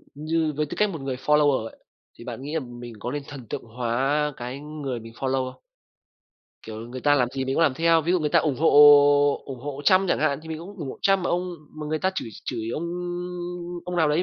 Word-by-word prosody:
ừm, 150 - -8
như 160 -1 +1
với 150 - +1
tư - - -7
cách 210 -1 +3
một 160 -7 -6
người 135 -1 -3
follower 145 -4 +3
ấy, - - -10 0.4
thì - - -11
bạn 120 0 -7
nghĩ 145 +3 -6
là 160 - +1
mình 120 -2 -9
có 120 +4 -4
nên 145 0 -4
thần 135 -5 -9
tượng - - -4
hóa 130 +6 0
cái 125 +3 -6
người 145 -5 -5
mình 115 0 -11
follow 130 0 -1
không? - - -26 1.1
Kiểu 110 -1 -7
người 130 +1 -7
ta 145 +2 +4
làm 125 -4 +2
gì 135 - -1
mình 135 +1 -1
cũng 165 - +3
làm 140 -5 +3
theo. 165 +1 +3
Ví 170 +4 +1
dụ 185 - +3
người 150 - +1
ta - - +5
ủng 145 -5 0
hộ 160 - +4 0.8
ủng 130 -3 -8
hộ 145 +1 -6
Trump 190 0 +4
chẳng - - +2
hạn, 150 -2 +1
thì 160 - -11
mình 160 - -4
cũng 195 +5 -10
ủng 150 -6 -5
hộ - - -10
Trump, 195 0 +4
mà 180 - -2
ông 180 +1 -1 0.3
mà 150 - -4
người 155 +1 -1
ta 190 +3 +1
chửi 120 - -3 0.2
chửi 115 -1 -3
ông 165 - -3 1.0
ông 180 0 -4
nào 160 -3 +3
đấy 150 +4 +2
145 Hz, 255 wpm, -25 LUFS, 130-160 Hz, 1.1 s, ta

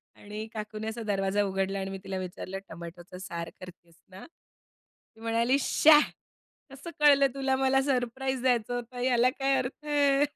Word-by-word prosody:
आणि 210 +1 -7
काकूनी 215 0 -5
असा 220 +1 -4
दरवाजा 200 0 0
उघडला 195 0 -1
आणि 190 0 -4
मी 195 - -5
तिला 190 0 -4
विचारलं 185 +1 -6
टोमॅटोचा 170 +2 -10
सार 170 -3 -5
करतीयेस 170 -2 -13
ना? 190 +1 -11 0.9
ती 225 - -18
म्हणाली, 230 +3 +2
"श्या 300 +2 +6 0.7
कसं 275 +5 -9
कळलं 285 -2 +6
तुला 270 -1 0
मला 270 0 +3
सरप्राईज 265 0 -1
द्यायचं 245 -2 +1
होतं 245 +1 -6
याला 250 -1 +3
काय 270 0 +2
अर्थ 260 +3 -4
आहे?" 285 -1 +3
230 Hz, 155 wpm, -28 LUFS, 195-270 Hz, 0.9 s, श्या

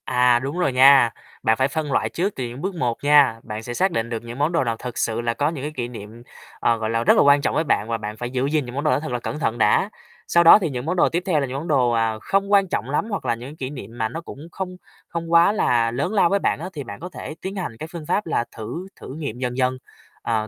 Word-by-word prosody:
À, 125 -1 +3
đúng 140 +6 -4
rồi 140 -7 +1
nha. 135 -1 +7 0.3
Bạn 110 0 +3
phải 130 - +2
phân 150 0 -3
loại - - +1
trước 190 +4 -2
từ 130 - -4
những 120 +4 -8
bước 190 +1 -3
một 125 -7 -1
nha, 145 -5 +5
bạn 105 +1 -6
sẽ 120 - -5
xác 190 +8 +1
định 115 -7 -2
được 115 -1 -4
những 120 +2 -8
món 150 +3 +2
đồ 170 - +1
nào 115 -2 -1
thực 125 0 -7
sự 115 0 -1
là 115 0 -1
có 145 +5 0
những 150 -5 -6
cái 150 - -3
kỷ 120 -2 -3
niệm, 115 0 -10 0.4
ờ, 115 - +2
gọi 110 -1 -3
là, 115 +1 0
rất - - +5
là - - +6
quan 140 0 +5
trọng - - -1
với 160 - +2
bạn 110 -8 0
và 115 - 0
bạn 105 0 -6
phải 120 +1 -4
giữ 130 +1 -1
gìn 150 -1 0
những 120 +1 -8
món 140 - -2
đồ 155 - +2
đó - - +2
thật 155 -3 -6
là 125 - -1
cẩn 150 - -5
thận 120 -5 -1
đã. 115 - +3 0.4
Sau 170 - +4
đó 170 +5 +9
thì 180 - -1
những 125 -2 -5
món 175 +3 -1
đồ 180 - +3
tiếp 175 +2 -1
theo 165 -5 +2
là 140 - 0
những 130 +2 -4
món 155 +5 -5
đồ, 130 -6 +3
à, 115 -1 0
không 195 +6 0
quan 200 -1 +5
trọng 120 - -3
lắm, 150 +10 -1
hoặc 200 -9 -4
là 120 -2 +1
những 125 +6 -9
kỷ 130 -3 -4
niệm 130 -4 -9
mà 110 -1 -1
nó 165 - -6
cũng 155 -1 -10
không 185 -1 -5 0.3
không 170 -1 -5
quá 170 +3 +6
là 120 - +2
lớn 145 - -2
lao 195 -5 +4
với 200 - +2
bạn - - 0
á 175 +4 -5
thì 145 - -5
bạn 100 -5 -9
có 180 - -7
thể 155 - -8
tiến 195 +1 -5
hành 175 - -5
cái 155 - -5
phương 170 -3 -7
pháp 210 - 0
là 160 - 0
thử 165 - -6
thử - - -8
nghiệm 140 -7 -5
dần 125 -1 -3
dần, 130 0 +1 0.4
ờ, 110 -2 -1
135 Hz, 305 wpm, -22 LUFS, 120-165 Hz, 0.4 s, đó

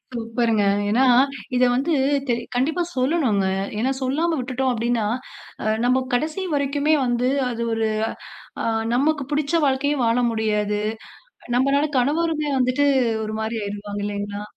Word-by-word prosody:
சூப்பருங்க! 230 -2 0 0.3
ஏன்னா, 240 +5 +3 0.5
இத 250 - +3
வந்து 275 +7 0 0.4
தெ 245 - +2 0.2
கண்டிப்பா 310 +8 +1
சொல்லணும்ங்க. 255 - +1 0.3
ஏன்னா, 255 +4 +1
சொல்லாம 310 +6 0
விட்டுட்டோம் 255 +1 -1
அப்பிடின்னா, 235 -1 0 0.6
அ - - -5 0.2
நம்ம 255 +1 +2
கடைசி 310 +9 0
வரைக்குமே 285 +2 +1
வந்து, 245 +1 +1 0.2
அது 235 -1 -4
ஒரு 225 0 0 0.8
அ - - -1 0.3
நமக்கு 285 +2 +1
புடிச்ச 290 +1 -1
வாழ்க்கையே 285 +2 +1
வாழ 230 +1 +2
முடியாது. 210 -2 0 0.8
நம்மளால 275 +4 +2
கணவருமே 305 +3 0
வந்துட்டு 255 +3 +2 0.4
ஒருமாரி 220 +1 -3
ஆயிருவாங்க, 205 0 -5
இல்லேங்களா! 205 0 -4
250 Hz, 125 wpm, -22 LUFS, 225-285 Hz, 0.8 s, ஏன்னா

